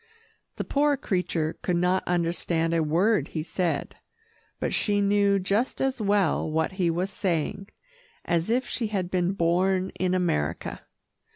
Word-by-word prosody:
The - - -3
poor 290 0 +2
creature 180 - -1
could 180 - 0
not 180 +2 +2
understand 170 -1 0
a 165 - +2
word 180 +8 +2
he 155 - -4
said, 170 -3 -2 0.6
but - - -1
she 205 -1 +2
knew 200 0 +3
just 200 +6 0
as 265 -3 0
well 200 -5 +2
what 160 +3 0
he 185 -2 0
was 180 +4 -1
saying, 190 +1 -2 0.6
as 170 +3 0
if 245 +2 +1
she 230 - -2
had 190 -4 -2
been 180 0 +1
born 185 +2 +1
in 185 0 -1
America. 85 - -1
185 Hz, 150 wpm, -26 LUFS, 170-200 Hz, 0.6 s, knew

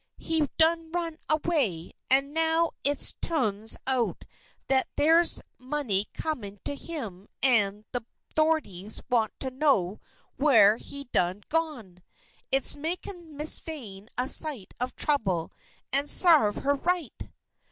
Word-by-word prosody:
"He 320 -3 -1
done 325 0 +3
run 335 -2 -3
away, 295 - 0 0.2
and 275 +2 +2
now 325 +1 +2
it 285 0 0
tu'ns 220 -9 0
out 260 -3 +1 0.4
that 265 -1 +1
there's 330 +3 +4 0.2
money 255 -7 -2
comin' 220 -11 -4
to - - -1
him 225 - -7 0.2
an' 210 -5 +2
the 245 -2 -3 0.3
'thorities 285 - +2
want 225 -3 +2
to 260 - -3
know 255 -9 +1 0.4
whar 225 -8 +5
he 280 +3 -8
done 185 -5 -1
gone. 285 - -3 0.5
It's 270 0 +3
makin' 335 0 -6
Miss 300 +1 +4
Vane 220 -10 -8
a 250 +1 +1
sight 280 - +4
of 250 +1 -3
trouble 195 - 0 0.4
an' 280 +2 +7
sarve 300 - +4
her 285 +1 +2
right!" 345 0 -2
275 Hz, 125 wpm, -27 LUFS, 215-315 Hz, 0.5 s, an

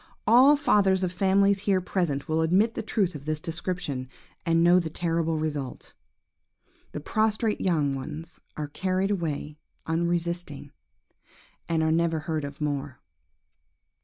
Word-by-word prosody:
All 260 +6 +7
fathers 200 -10 +3
of 180 - 0
families 195 +2 +3
here 195 -1 +1
present 170 -6 -2
will 160 0 +1
admit 190 +8 +3
the - - -3
truth 205 -4 0
of 145 -2 -9
this 155 -1 -1
description, 165 -5 -4 0.4
and 165 0 +3
know 175 +1 +6
the 165 -3 -3
terrible 165 0 -1
result. 150 -4 -4 1.0
The - - -5
prostrate 215 +6 0
young 155 -7 +1
ones 150 +5 -7 0.2
are 150 -1 -3
carried 190 +5 -1
away 155 -5 -3 0.3
unresisting, 170 -3 -2 1.0
and 160 -1 +1
are 160 - +2
never 165 -1 +1
heard 155 -1 -3
of 140 0 -8
more. 145 -3 -3
170 Hz, 135 wpm, -26 LUFS, 150-190 Hz, 1.0 s, All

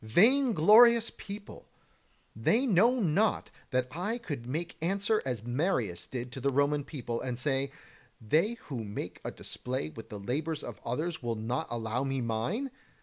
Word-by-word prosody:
Vainglorious 230 - +6
people! 205 0 -9 0.7
Know 110 - -12
they 240 - +4
not 215 - +3 0.2
that 130 0 +1
I 185 - -2
could 145 - -6
make 165 +6 -3
answer 200 +5 +1
as 120 -4 -2
Marius 120 - -1
did 125 -1 -5
to 130 - -6
the 140 - +2
Roman 145 +2 +2
people, 120 -6 -4
and 125 -2 -3
say: 135 0 0 0.5
They 160 - +2
who 125 -6 -4
make 105 -1 -6
a - - -3
display 125 -11 -4
with 110 +8 -10
the 105 -3 -6
labours 150 +9 -2
of 120 - -8
others 155 +8 -2
will 120 -2 -1
not 120 +8 -2
allow 115 +2 -2
me 135 -1 -1
mine? 125 - -1
140 Hz, 155 wpm, -30 LUFS, 120-200 Hz, 0.7 s, Vainglorious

